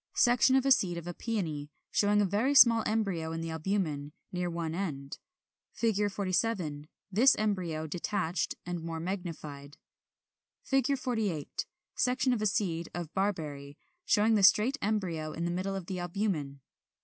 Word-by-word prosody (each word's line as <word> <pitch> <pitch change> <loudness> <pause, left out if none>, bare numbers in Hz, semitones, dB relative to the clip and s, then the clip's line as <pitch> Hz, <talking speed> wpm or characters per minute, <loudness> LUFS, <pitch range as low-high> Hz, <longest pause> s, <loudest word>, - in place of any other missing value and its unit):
46. - - +3
Section 245 +2 +4
of 265 0 +3
a 270 - +3
seed 185 -9 +3
of 170 - -6
a 175 - -4
Peony, 165 -10 -3 0.2
showing 205 0 +3
a - - +2
very 220 +9 +1
small 230 -4 +8
embryo 195 -7 -1
in 165 - -3
the 165 0 -4
albumen, 160 -4 -2 0.2
near 180 -1 -2
one 165 -2 -3
end. 145 -7 -4 0.6
47. 200 -7 0 0.2
This 245 +7 +5
embryo 180 -7 -1
detached, 175 +2 -2
and 175 -1 -4
more 165 0 -4
magnified.] 160 -6 -6 0.9
[Illustration: 270 0 +4
Fig. - - -6
48. 215 - -2 0.3
Section 255 +1 +1
of 225 - -1
a 215 - +3
seed 185 -6 -1
of 170 -2 -5
Barberry, 150 -8 -2 0.3
showing 220 -6 +3
the 210 - +3
straight 215 +8 +5
embryo 180 -7 -1
in 170 - -3
the 175 - -1
middle 190 +2 -2
of 190 -3 -5
the 185 0 -4
albumen. 170 -7 -2
185 Hz, 160 wpm, -30 LUFS, 160-215 Hz, 0.9 s, small